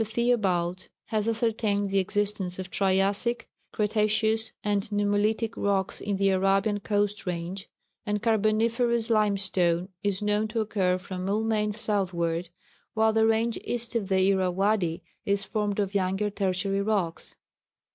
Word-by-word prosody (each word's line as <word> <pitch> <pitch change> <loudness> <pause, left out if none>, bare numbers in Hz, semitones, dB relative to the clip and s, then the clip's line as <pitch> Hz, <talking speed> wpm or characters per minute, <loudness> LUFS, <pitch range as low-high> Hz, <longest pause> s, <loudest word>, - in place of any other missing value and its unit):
Theobald 200 -6 0 0.2
has 215 -1 0
ascertained 215 -3 0
the 195 - +3
existence 195 -1 -1
of 185 -1 -6
Triassic, 200 +5 +1 0.2
Cretaceous, 215 +1 +1
and 205 -1 +1
Nummulitic 210 +2 +1
rocks 195 -2 0
in 200 -1 -2
the 195 0 +3
Arabian 195 +2 +2
coast 205 -1 -1
range; 180 +3 -4 0.3
and 210 -1 -1
Carboniferous 230 +2 +1
limestone 195 -4 +1
is 200 0 -1
known 210 +1 +1
to 220 +1 -3
occur 195 -4 +1
from 185 0 -6
Moulmein 210 +1 0
southward, 180 -5 -1 0.5
while 220 0 +3
the 220 0 +4
range 225 +1 +1
east 240 0 -1
of 210 -4 -1
the 190 0 +3
Irrawadi 190 -2 +1 0.2
is 200 0 0
formed 210 0 -2
of 200 -1 -1
younger 195 +1 0
Tertiary 195 0 0
rocks. 200 -5 -2
205 Hz, 130 wpm, -27 LUFS, 190-220 Hz, 0.5 s, the